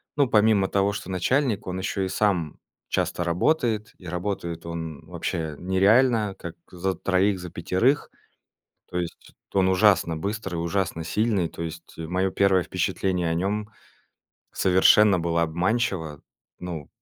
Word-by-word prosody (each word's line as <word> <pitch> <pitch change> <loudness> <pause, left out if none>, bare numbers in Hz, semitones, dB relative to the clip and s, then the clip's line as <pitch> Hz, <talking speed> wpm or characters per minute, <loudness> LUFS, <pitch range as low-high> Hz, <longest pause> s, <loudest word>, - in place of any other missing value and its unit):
ну, 140 -2 +3
помимо 105 -3 +4
того, 100 +1 +1
что 100 -2 -6
начальник, 115 +3 0
он 90 +1 -3
ещё 95 0 -2
и - - -1
сам 90 -6 0 0.3
часто 85 - -1
работает, 110 - 0
и 90 - -12
работает 85 -2 -4
он 80 -2 -6
вообще 80 -3 -4
нереально, 105 +4 +3
как 85 -2 -7 0.2
за 95 +1 -2
троих, 95 +2 +1
за 90 -1 -7
пятерых. 105 - +1 0.8
То 90 - -4
есть 85 -1 -6 0.2
т - - 0
он 95 0 +4
ужасно 95 -4 +3
быстрый, 100 0 -4
ужасно 85 -1 -2
сильный, 105 -2 +1
то 85 - -9
есть 85 0 -8
мое 90 +4 -1
первое 95 -1 +3
впечатление 90 -1 -1
о - - 0
нём 105 +4 -1 0.8
совершенно 95 +1 +5
было 85 0 0
обманчиво. 85 - -1 0.4
Ну 85 -5 -6
95 Hz, 140 wpm, -25 LUFS, 85-105 Hz, 0.8 s, совершенно